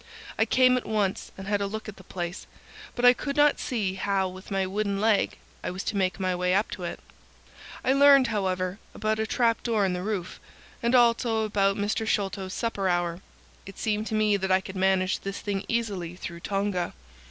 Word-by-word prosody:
I 220 - +2
came 255 +2 +4
at 250 - -4
once 210 -3 -1
and 190 - -7
had 205 0 0
a 200 - 0
look 220 +2 -6
at 215 - -8
the 190 - -13
place, 175 0 -5 0.5
but 245 - +1
I 245 - +9
could 280 +3 -4
not 295 -1 +4
see 210 -7 -1
how 195 0 0
with 185 +1 -10
my 195 -1 0
wooden 200 +1 -1
leg 215 -1 +2 0.3
I - - -2
was 185 +2 -5
to - - -3
make 190 -1 0
my 185 -1 0
way 180 +1 +1
up 205 +3 +1
to 185 - -6
it. 170 - -5 0.9
I 260 - +4
learned, 275 -1 +7
however, 185 -2 -1 0.2
about 215 0 -1
a 220 - 0
trap 230 -1 +1
door 220 -4 +1
in 185 - 0
the 180 - -3
roof, 195 -3 -4 0.4
and 235 +1 +2
also 230 -2 +3
about 200 -2 +1
Mr. 210 +2 -1
Sholto's 195 -3 -1
supper 205 -5 -1
hour. 175 0 0 0.5
It 195 - -10
seemed 215 0 -1
to 220 - -2
me 215 -1 +3
that 190 -1 -2
I 185 - +5
could 190 0 -9
manage 185 0 +2
the 195 - -4
thing 200 -1 -3
easily 200 -7 -2
through 170 -1 -7
Tonga. 195 -1 -2
200 Hz, 210 wpm, -27 LUFS, 190-220 Hz, 0.9 s, I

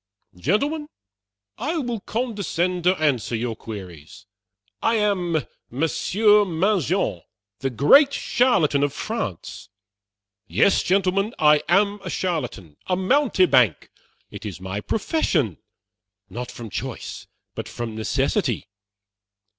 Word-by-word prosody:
Gentlemen, 285 - 0 0.7
I 305 +9 -1
will 240 -7 -2
condescend 195 -6 -2
to 185 +1 +5
answer 130 -7 +1
your 115 0 -2
queries. 90 -11 -10 0.6
I 230 - +2
am 180 - 0 0.2
Monsieur 205 - +3
Mangin, 185 - 0 0.4
the 135 - -1
great 150 - +6
charlatan 240 - +2
of 145 -1 +1
France! 215 - -5 0.8
Yes, 200 - +3
gentlemen, 195 +3 +1
I 150 -1 +5
am 200 +3 +3
a 185 - -5
charlatan 125 - -3
a 185 - +1
mountebank; 185 - +3 0.4
it - - -9
is 95 -6 -6
my 95 +2 -4
profession, 150 - 0 0.7
not 125 +1 -5
from 120 -3 -9
choice, - - -6 0.3
but - - -6
from 120 -2 -5
necessity. 110 -1 -1
175 Hz, 105 wpm, -23 LUFS, -, 0.8 s, great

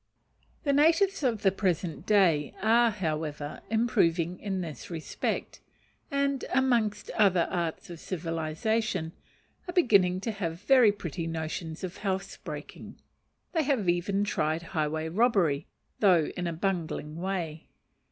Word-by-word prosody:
The 280 - +2
natives 330 +7 +4
of 235 -7 0
the 195 - +5
present 180 -4 -2
day 175 -8 +3
are, 230 +2 +4
however, 155 -7 -3
improving 180 -6 +1
in 195 -2 -2
this 160 -4 -7
respect, 165 -2 -3 0.5
and, 280 -2 0
amongst 240 -5 +1
other 185 -5 +3
arts 170 -1 -3
of 170 - -8
civilization, 165 +3 -2 0.6
are - - -3
beginning 200 - +4
to 225 - -2
have 175 -4 -4
very 245 -2 +6
pretty 170 -4 -5
notions 160 +1 -4
of 185 -1 -5
housebreaking; 195 -1 -5 0.5
they 325 - +1
have 270 -9 0
even 180 +3 +1
tried 160 -5 -1
highway 155 0 -1
robbery, 175 - +2 0.3
though 180 -7 +4
in 180 -1 -2
a 170 - -2
bungling 165 -3 -2
way. 170 -4 -3
185 Hz, 125 wpm, -28 LUFS, 165-220 Hz, 0.6 s, very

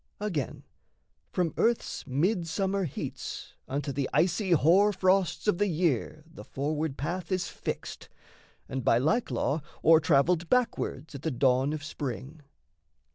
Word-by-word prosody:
Again, 175 - -3 0.7
from 175 -3 0
earth's 235 0 0
midsummer 185 - 0
heats 145 - -6
Unto 140 +1 -2
the 135 0 -2
icy 185 +3 +1
hoar 180 +5 +5
frosts 185 0 +1
of 205 -4 +2
the 205 - +3
year 155 - 0
The 165 0 -12
forward 150 +1 -2
path 170 +4 -4
is 185 -1 0
fixed, - - -6 0.6
and 130 -1 -4
by 115 - +4
like 160 - +1
law 140 +5 0 0.2
O'ertravelled 165 +1 +4
backwards 225 - 0
at 140 - -7
the 160 - -1
dawn 130 +1 +2
of 155 -1 -4
spring. 145 +1 -6
160 Hz, 130 wpm, -28 LUFS, 140-185 Hz, 0.7 s, hoar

